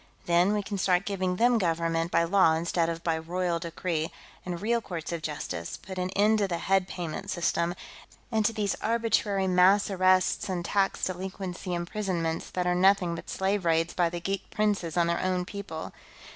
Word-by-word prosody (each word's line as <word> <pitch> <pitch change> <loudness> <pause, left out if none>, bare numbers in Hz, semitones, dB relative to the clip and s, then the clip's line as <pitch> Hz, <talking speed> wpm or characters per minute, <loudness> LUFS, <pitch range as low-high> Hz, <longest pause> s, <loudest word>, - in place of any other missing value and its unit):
Then, 175 +4 +3
we 210 -1 0
can 200 0 -4
start 180 0 +2
giving 185 -2 -1
them 240 +3 +3
government 165 -2 0
by 170 -1 +3
law 170 -2 +4
instead 165 0 0
of 165 0 -4
by 165 -1 0
royal 175 +1 -1
decree, 165 -1 -3 0.3
and 175 -2 -4
real 230 +4 +1
courts 170 -6 -6
of 170 -1 -3
justice; 145 - -4
put 190 -1 -8
an 180 0 -1
end 215 +2 +4
to 200 - +2
the 175 -2 -2
head 190 +1 +1
payment 180 +2 -5
system, 175 -1 0 0.6
and 220 -1 +2
to 220 - +2
these 210 -3 -1
arbitrary 220 -4 +1
mass 185 +3 +4
arrests 185 0 +2
and 175 -2 -2
tax 195 -1 +1
delinquency 185 0 -4
imprisonments 175 -2 -2
that 180 -1 -2
are 180 - +2
nothing 185 -1 +3
but 170 - -7
slave 190 +1 0
raids 165 0 +1
by 175 -2 +2
the 175 +1 -5
geek 195 +3 -3
princes 205 -6 0
on 170 - +4
their 170 0 0
own 185 -1 0
people. 195 -5 -7
180 Hz, 185 wpm, -28 LUFS, 170-195 Hz, 0.6 s, law